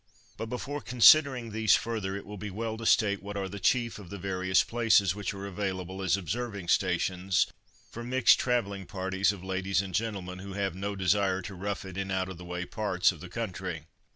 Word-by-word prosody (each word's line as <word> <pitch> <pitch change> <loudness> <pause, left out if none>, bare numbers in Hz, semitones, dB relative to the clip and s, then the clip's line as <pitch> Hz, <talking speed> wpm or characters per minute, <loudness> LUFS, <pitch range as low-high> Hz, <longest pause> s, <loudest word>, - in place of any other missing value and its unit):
But 115 - -5
before 135 +5 -4
considering 125 -1 +5
these 110 -1 +4
further 110 -4 -2
it 100 - -6
will 105 - -8
be 105 - -5
well 110 +3 -3
to 115 0 -3
state 100 -3 +3
what 100 +1 -6
are 100 -1 -2
the 100 +1 -7
chief 115 +3 +1
of 95 -4 -11
the 100 - -6
various 95 0 +1
places 115 -6 +3
which 100 -1 -3
are 100 0 -7
available 95 -1 -4
as 95 0 +2
observing 100 0 -4
stations 90 0 +2 0.5
for 120 - -7
mixed 125 0 +4
travelling 100 -7 -1
parties 95 +1 0
of 100 -3 -9
ladies 95 0 0
and 95 -2 -3
gentlemen 100 -5 -3
who 100 +1 -8
have 95 -2 -1
no 100 +3 -4
desire 95 0 +1
to 100 - -7
rough 100 +2 -4
it 95 -1 -8
in 95 0 -3
out 95 -1 -1
of 95 -2 -8
the 90 - -9
way 90 0 -4
parts 100 -3 +1
of 85 - -11
the 90 - -9
country. 90 -7 -4
100 Hz, 210 wpm, -29 LUFS, 95-110 Hz, 0.5 s, considering